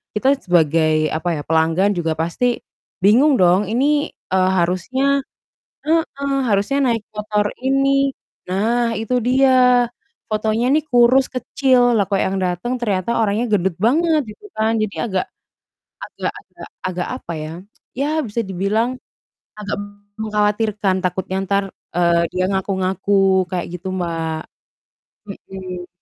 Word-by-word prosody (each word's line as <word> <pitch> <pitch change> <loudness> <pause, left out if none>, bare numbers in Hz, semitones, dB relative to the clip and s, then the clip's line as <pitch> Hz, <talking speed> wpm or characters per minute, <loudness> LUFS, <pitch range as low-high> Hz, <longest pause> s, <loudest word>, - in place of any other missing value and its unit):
kita 265 +6 +3
sebagai 155 -3 +3
apa 160 0 -1
ya, - - -4
pelanggan 165 +5 +2
juga 165 -2 -1
pasti 235 +10 0 0.4
bingung 255 +6 +5
dong 180 +3 +4
ini, 290 +5 +1
eee, 185 0 0
harusnya 220 +11 +1 0.6
heeh, 280 -4 0
harusnya 205 +5 +1 0.2
naik 225 - -2
motor 210 -1 -1 0.2
ini. 275 0 +2 0.4
Nah 230 +5 +1
itu 250 +3 0
dia, 250 -1 +4 0.4
fotonya 215 +2 0
nih 305 0 +2
kurus 250 +1 +5
kecil, 250 -1 +2
lah 200 - +2
kok 200 -2 +1
yang 195 +1 -1
datang 185 +7 -2
ternyata 205 +1 0
orangnya 220 +2 +1
gendut 190 -3 +2
banget 310 +7 +3
gitu 210 - -13
kan. 220 +1 +1
Jadi 215 -1 -2
agak, 190 -5 -1 0.8
agak-agak - - -7 0.2
agak 180 -1 -3
apa 170 - -6
ya, 155 - -6 0.5
ya 280 +2 0 0.2
bisa 230 +2 -2
dibilang 210 +6 -1 0.6
agak 210 -1 -3 0.4
mengkhawatirkan, 210 -2 0
takutnya 185 +1 -2
entar, 200 +1 +1 0.3
eee, 170 -1 +3
dia 185 0 0
ngaku-ngaku 190 0 +1
kayak 175 -1 -2
gitu, 190 - -7
Mbak. 165 -3 -2 0.9
Mhm. 185 -2 -8
210 Hz, 125 wpm, -20 LUFS, 185-245 Hz, 0.9 s, bingung